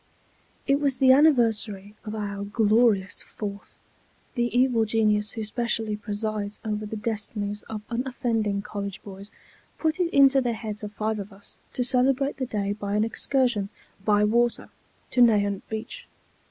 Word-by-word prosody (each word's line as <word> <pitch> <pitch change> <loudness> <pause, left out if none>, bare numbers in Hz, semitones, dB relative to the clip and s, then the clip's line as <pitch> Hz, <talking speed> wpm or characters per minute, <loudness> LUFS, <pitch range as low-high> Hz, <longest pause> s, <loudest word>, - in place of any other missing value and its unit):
It 275 0 +3
was 280 -3 +1
the 260 0 +6
anniversary 225 -8 +3
of 215 0 -5
our 200 -1 -4
Glorious 210 -2 +2
Fourth. 200 -1 -7 0.6
The 240 -2 +1
evil 245 -1 +2
genius 215 -1 +1
who 220 - -4
specially 225 -1 -1
presides 210 -1 -4
over 215 0 -2
the 220 - -5
destinies 210 -1 -3
of 215 -1 -5
unoffending 230 -5 -1
college 200 -2 -6
boys 200 0 -10 0.5
put 320 +2 0
it 345 -2 +1
into 275 -1 +6
the 240 -2 0
heads 215 -1 -5
of 210 -1 -6
five 215 +1 -2
of 200 +1 -7
us 195 +1 -12
to 250 - 0
celebrate 265 +2 +2
the 260 -2 -2
day 205 -3 -1
by 205 -1 -3
an 210 - +3
excursion 230 -3 0 0.3
by 210 0 +3
water 235 +3 +1 0.4
to 250 - +3
Nahant 205 -4 +4
Beach. 220 - -6
220 Hz, 155 wpm, -26 LUFS, 205-245 Hz, 0.6 s, the